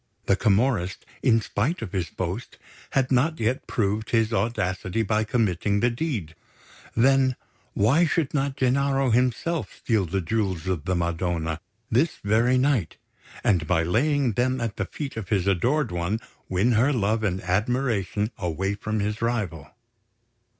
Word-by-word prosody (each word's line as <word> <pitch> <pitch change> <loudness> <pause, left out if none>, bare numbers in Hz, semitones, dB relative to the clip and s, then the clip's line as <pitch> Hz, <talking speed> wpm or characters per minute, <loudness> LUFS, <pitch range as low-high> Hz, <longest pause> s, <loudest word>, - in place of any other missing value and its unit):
The 100 - +3
Camorrist, 100 -2 +1 0.2
in 115 -4 +4
spite 135 - -1
of - - -6
his 90 -5 -2
boast, 95 +6 -5 0.4
had 135 -1 +1
not 150 +6 +2
yet 120 +4 -1
proved 105 0 -1
his 115 -1 +2
audacity 110 -3 -1
by 110 +1 +1
committing 100 -3 +1
the 120 +3 +2
deed; 115 - -3 0.6
then, 130 +1 +4 0.4
why 140 +12 +4
should 155 -2 0
not 140 -2 0
Gennaro 135 0 +2
himself 125 +7 0
steal 110 -6 0
the 95 +4 -1
Jewels 95 -2 -1
of 90 -4 -2
the 95 0 0
Madonna 85 -1 -1 0.3
this 140 +8 +2
very 115 +5 +3
night, 130 - +1 0.5
and 85 -6 +2
by 85 -3 +2
laying 130 - +2
them 130 +4 0
at 115 -4 -3
the 105 - -1
feet 140 - -6
of 110 -4 -5
his 100 -4 +1
adored 120 - +1
one, 85 +5 -1 0.3
win 95 +7 +2
her 120 +5 +3
love 110 -3 +1
and 95 -3 0
admiration 105 +1 0
away 95 +2 -1
from 110 +1 -2
his 105 +2 -2
rival? 105 - -2
110 Hz, 150 wpm, -25 LUFS, 95-125 Hz, 0.6 s, in